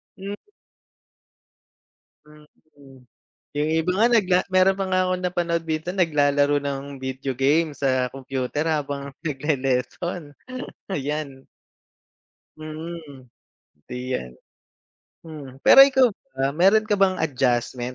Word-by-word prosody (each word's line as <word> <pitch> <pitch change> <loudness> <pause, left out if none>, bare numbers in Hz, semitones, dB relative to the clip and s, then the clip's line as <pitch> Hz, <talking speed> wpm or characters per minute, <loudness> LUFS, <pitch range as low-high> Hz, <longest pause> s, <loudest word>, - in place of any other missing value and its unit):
Hmm. 200 +1 -6 1.9
Mm. 150 -3 -19 0.5
'Yong 150 +2 0
iba 175 +3 -1
nga 225 +4 +4
nagla 190 -5 +4
meron 185 +1 +4
pa 195 - +1
nga 185 0 +2
akong 185 0 -1
napanood 170 -2 -1
dito 160 +1 -3
naglalaro 145 -5 +2
ng 140 -1 -3 0.2
video 130 +1 -4
game 150 +5 +2
sa 130 -3 0
kompyuter 135 +3 -3
habang 140 -2 -2 0.2
nagle-lesson, 145 +2 -2 0.6
ayan. 140 -3 -4 1.1
Mm, 155 -3 -8 0.6
iyan. 125 - -5 0.9
Hmm, 145 -5 -10
pero 270 - +9
ikaw 265 -2 +4 0.3
ba, 135 +1 0
meron 195 +8 +4
ka 205 - +2
bang 195 -1 +3
adjustment 125 -3 -1
150 Hz, 105 wpm, -23 LUFS, 135-170 Hz, 1.9 s, pero